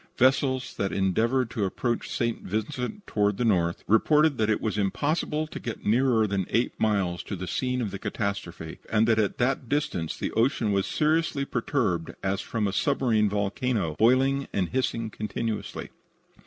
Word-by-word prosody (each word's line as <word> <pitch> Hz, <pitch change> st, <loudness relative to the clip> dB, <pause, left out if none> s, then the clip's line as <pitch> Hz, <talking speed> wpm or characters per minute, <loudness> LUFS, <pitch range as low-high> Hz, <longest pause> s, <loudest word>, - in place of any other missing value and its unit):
Vessels 130 Hz, 0 st, +2 dB
that 100 Hz, -, -1 dB
endeavored 115 Hz, +6 st, +1 dB
to 110 Hz, -, -2 dB
approach 120 Hz, +5 st, -1 dB
St. 115 Hz, -1 st, -1 dB
Vincent 125 Hz, -, -4 dB
toward 105 Hz, -1 st, +1 dB
the 120 Hz, -, 0 dB
north 85 Hz, -6 st, +1 dB
reported 150 Hz, +5 st, +3 dB
that 110 Hz, -1 st, +2 dB
it 110 Hz, -, +2 dB
was 110 Hz, -, -2 dB
impossible 150 Hz, -, 0 dB
to 155 Hz, -, -8 dB
get 115 Hz, -3 st, -6 dB
nearer 115 Hz, 0 st, +3 dB
than 100 Hz, -3 st, -1 dB
eight 120 Hz, +2 st, +1 dB
miles 100 Hz, -5 st, +1 dB
to -, -, -5 dB
the 95 Hz, 0 st, -5 dB
scene 125 Hz, +5 st, -1 dB
of 105 Hz, -, -3 dB
the 100 Hz, -, -6 dB
catastrophe, 100 Hz, -7 st, -4 dB
and 110 Hz, +1 st, +3 dB
that 110 Hz, -1 st, +3 dB
at 105 Hz, -2 st, 0 dB
that 125 Hz, 0 st, 0 dB
distance 145 Hz, -, -1 dB
the -, -, -3 dB
ocean 115 Hz, -2 st, +1 dB
was 100 Hz, -1 st, +1 dB
seriously 155 Hz, -2 st, +1 dB
perturbed 115 Hz, -, -1 dB
as 95 Hz, 0 st, 0 dB
from 110 Hz, -3 st, -1 dB
a 95 Hz, -, -2 dB
submarine 115 Hz, -4 st, +2 dB
volcano, 100 Hz, -, -1 dB
boiling 135 Hz, +4 st, +3 dB
and 95 Hz, -3 st, 0 dB
hissing 115 Hz, -3 st, -1 dB
continually. 110 Hz, +1 st, -4 dB
110 Hz, 170 wpm, -27 LUFS, 100-130 Hz, -, reported